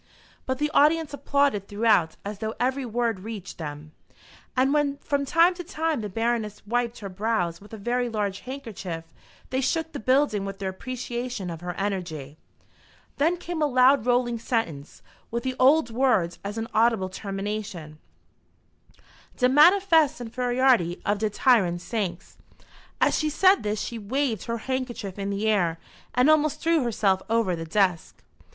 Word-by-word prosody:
But 260 0 -1
the 300 +2 -1
audience 310 +1 +3
applauded 280 -8 +1
throughout 205 -6 +2
as 205 0 -5
though 220 0 -3
every 260 +1 0
word 230 -3 -1
reached 200 -3 -8
them; 150 -1 -7 0.7
and 265 +2 +3
when 290 -2 +1
from 280 0 -1
time 335 +5 +4
to 355 0 -7
time 320 - -2
the 210 - -4
Baroness 225 0 -2
wiped 240 +1 -1
her 200 - -5
brows 190 -3 -1
with 205 - -15
a 220 - -7
very 245 +3 -1
large 205 -3 -2
handkerchief, 220 -11 -6 0.5
they 260 0 0
shook 320 +4 -1
the - - -6
building 255 -4 +2
with 195 0 -5
their 190 -1 -3
appreciation 240 -2 -5
of 165 0 -7
her 175 0 -5
energy. 170 -8 -4 0.8
Then 325 +5 +2
came 345 -2 -5
a 300 - +3
loud 255 -2 +4
rolling 245 -1 +1
sentence, 170 - -3 0.3
with 235 +1 -3
the 260 -1 -2
old 265 -1 +4
words 225 -9 +1
as 205 +2 -5
an 225 0 -3
audible 225 -3 +3
termination 195 -5 -5 1.4
"de 250 -1 +3
manifest 320 0 +5
infairiority 245 -6 +1
of 205 0 +1
de 215 0 0
tyrant 200 -6 +3
saix!" 185 -3 -4 0.6
As - - +3
she 310 - 0
said 375 +6 +4
this 210 0 -2
she 235 - -4
waved 230 0 -1
her 230 0 -2
handkerchief 250 -7 -4
in 200 0 -2
the 200 +2 -1
air 175 -6 +2 0.4
and 250 +3 +4
almost 305 -1 +3
threw 330 -1 +2
herself 205 -6 +1
over 225 -5 +1
the 165 0 -6
desk. 180 0 0
230 Hz, 160 wpm, -25 LUFS, 195-265 Hz, 1.4 s, manifest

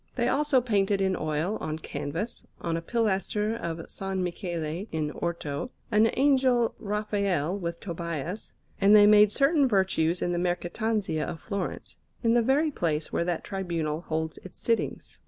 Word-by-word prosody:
They 240 -2 +1
also 275 -1 +3
painted 205 -4 +1
in 190 -1 +1
oil, 155 +7 -1
on 155 0 -3
canvas, 155 +7 -4 0.2
on 165 -1 -2
a 165 - -2
pilaster 210 +1 0
of 170 -7 -4
S. 165 - -8
Michele 180 -2 -3
in 155 -2 -1
Orto, 165 - -3 0.2
an 215 +1 +5
Angel 260 -4 +3
Raphael 200 -5 -1
with 170 -4 -4
Tobias; 170 +2 -5 0.3
and 200 +1 +6
they 205 -1 +8
made 210 0 +7
certain 280 +3 +3
Virtues 185 -5 +1
in 175 - 0
the 175 - 0
Mercatanzia 180 0 -1
of 160 - -5
Florence, 200 -3 -5 0.3
in 230 0 +4
the 240 - +5
very 280 +6 +2
place 160 - -2
where 170 - +1
that 175 -2 -1
Tribunal 170 -5 -2
holds 160 -1 -3
its 185 - -12
sittings. 230 -1 -1
190 Hz, 155 wpm, -27 LUFS, 165-220 Hz, 0.3 s, they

